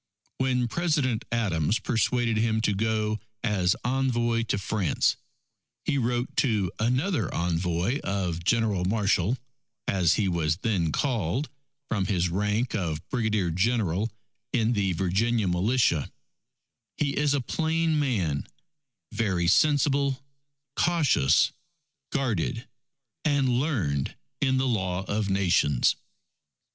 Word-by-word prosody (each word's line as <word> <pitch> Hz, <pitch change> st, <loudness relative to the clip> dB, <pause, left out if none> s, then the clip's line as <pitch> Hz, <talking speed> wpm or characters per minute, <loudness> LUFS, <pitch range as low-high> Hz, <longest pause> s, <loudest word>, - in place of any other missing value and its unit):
When 125 Hz, -2 st, +1 dB
President 140 Hz, -6 st, 0 dB
Adams 100 Hz, -5 st, +1 dB
persuaded 115 Hz, +1 st, 0 dB
him 110 Hz, 0 st, +1 dB
to 105 Hz, -, +1 dB
go 110 Hz, +1 st, 0 dB, 0.2 s
as 95 Hz, -6 st, +2 dB
envoy 120 Hz, -3 st, +1 dB
to 105 Hz, -, 0 dB
France, 100 Hz, -4 st, 0 dB, 0.7 s
he 140 Hz, -, +1 dB
wrote 120 Hz, +1 st, -1 dB
to 105 Hz, -9 st, +1 dB
another 125 Hz, -, 0 dB
envoy 90 Hz, -, 0 dB
of 90 Hz, -4 st, -2 dB
"General 105 Hz, -2 st, +1 dB
Marshall," 100 Hz, +2 st, +1 dB, 0.5 s
as 90 Hz, -4 st, +3 dB
he 105 Hz, -, +1 dB
was 80 Hz, -3 st, 0 dB
then 90 Hz, -8 st, +1 dB
called, 120 Hz, -, -1 dB, 0.4 s
from 100 Hz, -4 st, -1 dB
his 90 Hz, -3 st, +1 dB
rank 105 Hz, +6 st, 0 dB
of 85 Hz, -7 st, -3 dB
Brigadier 110 Hz, -8 st, 0 dB
General 100 Hz, +1 st, +1 dB, 0.4 s
in 115 Hz, -1 st, +2 dB
the 100 Hz, -4 st, +1 dB
Virginia 100 Hz, +5 st, +1 dB
Militia: 90 Hz, -, +1 dB, 0.9 s
"He 145 Hz, -2 st, 0 dB
is 145 Hz, -1 st, +2 dB
a -, -, +1 dB
plain 160 Hz, +3 st, 0 dB
man, 95 Hz, -, -1 dB, 0.6 s
very 100 Hz, -6 st, 0 dB
sensible, 140 Hz, -, +3 dB, 0.5 s
cautious, 165 Hz, -, +3 dB, 0.6 s
guarded, 125 Hz, -, -1 dB, 0.6 s
and 145 Hz, -3 st, +2 dB
learned 90 Hz, -, -1 dB, 0.3 s
in 130 Hz, -1 st, +2 dB
the 130 Hz, 0 st, +1 dB
Law 95 Hz, -5 st, -1 dB
of 105 Hz, 0 st, -2 dB
Nations." 90 Hz, -9 st, +2 dB
110 Hz, 110 wpm, -27 LUFS, 90-125 Hz, 0.9 s, as